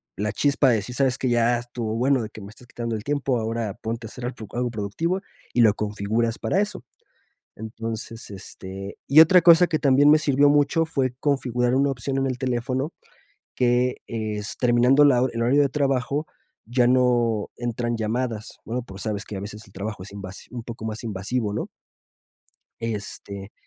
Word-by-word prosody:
la 105 +1 -1
chispa 140 +1 +3
de 115 - +4
decir: 110 +4 -5
"¿Sabes 130 -2 +1
qué?". 130 - 0
Ya 120 0 +3
estuvo 120 -2 -4
bueno 130 0 +2
de 110 - -6
que 110 - -10
me 100 - -9
estás 115 +3 -15
quitando 115 -1 -4
el 105 - -5
tiempo, 140 -2 0
ahora 110 -2 -3
ponte 115 0 -5
a - - -10
hacer 120 - -7
algo 115 -4 -6
algo 120 0 -1
productivo 160 - -2 0.3
y 120 - +3
lo 105 -3 +5
configuras 105 +2 -1
para 195 - 0
eso. 210 0 -2 0.7
Entonces, 110 0 -6
este, 95 0 -8
y 150 +3 +7
otra 170 +2 +8
cosa 175 +1 +7
que 160 - 0
también 140 0 +5
me 155 - +8
sirvió 145 -1 +3
mucho 145 +3 +3
fue 130 -5 -1
configurar 125 -3 +1
una 140 +1 +3
opción 135 +1 -3
en 135 - +1
el 130 -2 -2
teléfono 130 +3 -1 0.6
que 125 0 +2
es 110 -2 -4
terminando 125 +4 +5
la 125 -3 +4
hor 130 - 0
el 115 - -2
horario 135 +5 +4
de 140 - +1
trabajo 140 +1 0 0.4
ya 120 +1 +2
no 120 -4 +2
entran 120 -1 -2
llamadas, 115 0 -3
bueno, 120 +2 -3
pues, 95 -4 -8
sabes 105 -2 -3
que 105 - -7
a - - -4
veces 105 +2 -7
el 95 - -20
trabajo 100 0 -5
es 100 - -10
invas 100 -1 -8
un 120 -1 -5
poco 115 -1 -8
más 110 +1 -4
invasivo, 105 +1 -2
¿no? 105 - -3 1.1
Este. 100 -2 -5
120 Hz, 190 wpm, -24 LUFS, 110-135 Hz, 1.1 s, otra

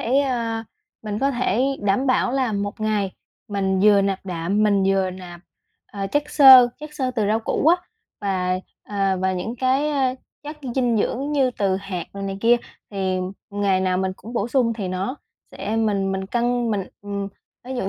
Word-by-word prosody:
thể, 270 +2 +4
ờ, 230 -4 -2 0.4
mình 210 -1 -3
có 275 +3 +2
thể 245 -3 0 0.2
đảm 205 +7 +1
bảo 255 -1 +2
là 260 -4 0
một 205 +1 -3
ngày 210 -3 0 0.4
mình 190 -2 0
vừa 205 0 +6
nạp 195 -1 -2
đạm, 180 +3 -1
mình 200 -2 +3
vừa 195 -1 +2
nạp, 180 -2 -10 0.5
ờ, 200 -1 -5
chất 290 +9 +1
xơ 260 -4 +9
chất, 300 0 -8
xơ 260 -3 -1
từ 225 -5 -1
rau 215 +2 +1
củ 230 - -1
á, 340 +2 +7 0.4
và, 185 -3 0 0.3
ờ, 195 -2 0
và 190 0 +1
những 205 +7 -4
cái, 265 +4 +1
a, 265 -3 +1 0.3
chất 300 +1 -7 0.2
dinh 245 -3 +2
dưỡng 275 +7 -1
như 270 -3 +2
từ 195 -5 0
hạt 190 -3 -5
rồi 200 - -7
này 195 0 -4
kia. 235 +2 +5 0.3
Thì 190 -2 -1 0.3
ngày 200 -2 +1
nào 185 -1 +1
mình 190 0 -1
cũng 225 +5 -10
bổ 230 -2 -1
sung 245 -2 +2
thì 205 -5 -4
nó 190 +8 -3 0.3
sẽ 220 - -4
mình 200 -3 +1
mình 190 0 -3
cân 240 +2 0
mình 200 -3 -1 0.2
ừm, 200 -1 -4 0.4
ví 260 +1 -5
dụ 195 -6 -1
210 Hz, 195 wpm, -22 LUFS, 195-250 Hz, 0.5 s, xơ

